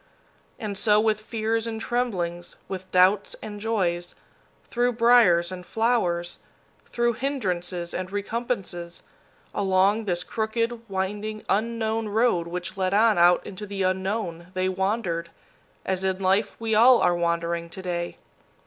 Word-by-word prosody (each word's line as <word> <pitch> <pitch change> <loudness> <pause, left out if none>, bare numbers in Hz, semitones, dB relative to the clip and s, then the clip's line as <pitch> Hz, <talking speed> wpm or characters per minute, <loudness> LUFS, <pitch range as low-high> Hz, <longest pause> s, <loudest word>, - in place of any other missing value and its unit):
And 205 -4 -4
so, 210 -1 +4
with 215 -1 +1
fears 225 +1 -1
and 225 -1 -4
tremblings, 185 -8 -2
with 185 -1 -7
doubts 185 +2 +3
and 210 -1 -7
joys, 180 -6 -1 0.5
through 245 +1 0
briers 225 -8 +5
and 180 -1 -7
flowers, 180 -6 0 0.5
through 240 0 +1
hindrances 180 -10 -3
and 185 0 -4
recompenses, 200 -5 -4 0.5
along 195 +3 +2
this 180 -2 -1
crooked, 230 +1 -2
winding, 210 +3 -3
unknown 225 +1 0
road 210 -6 +2
which 180 +2 -5
led 190 0 +1
on 215 -2 +4
out 175 +1 +5
into 205 +2 -7
the 195 -1 -3
Unknown, 185 -2 -2
they 185 0 +1
wandered, 185 -3 -1 0.6
as 190 0 -1
in 190 -1 0
life 195 +2 +1
we 225 -1 -1
all 240 +4 +7
are 175 - +3
wandering 170 0 -1
to 190 - -7
day. 175 -1 -3
195 Hz, 135 wpm, -25 LUFS, 180-225 Hz, 0.6 s, all